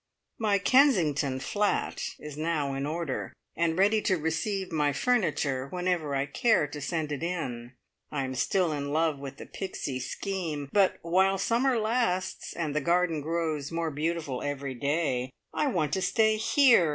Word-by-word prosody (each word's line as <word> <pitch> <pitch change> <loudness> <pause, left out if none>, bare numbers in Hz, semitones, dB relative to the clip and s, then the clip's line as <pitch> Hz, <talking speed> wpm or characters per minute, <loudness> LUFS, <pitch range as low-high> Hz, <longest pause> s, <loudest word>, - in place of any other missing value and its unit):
My 210 -3 +3
"Kensington" 180 - +3
flat 205 +9 0 0.2
is 150 -1 -8
now 155 -3 -1
in 135 +1 -2
order, 155 -3 -3 0.2
and 165 0 +1
ready 205 +3 +4
to 190 -3 +2
receive 180 +5 -2
my 150 -3 +1
furniture 150 - +1
whenever 180 -3 -1
I 135 0 +1
care 215 +4 +2
to 145 0 -7
send 155 +1 -2
it 145 - -3
in. 130 -9 -4 0.4
I 140 -2 -1
am 130 0 -3
still 175 +6 +1
in 145 -1 -3
love 155 -1 +1
with 140 -1 -7
the - - -8
Pixie 145 -8 -4
scheme; 155 -1 -4
but, 195 -2 +4
while 190 +3 +3
summer 240 +6 +2
lasts, 215 -5 0
and 155 -4 -3
the 150 - +1
garden 170 0 +2
grows 160 -2 -2
more 165 -1 -1
beautiful 155 -3 -2
every 140 -1 -3
day, 140 -1 0 0.2
I 300 - +1
want 160 - 0
to 190 - +1
stay 220 +4 +3
here! 230 - +5
165 Hz, 165 wpm, -28 LUFS, 145-190 Hz, 0.4 s, here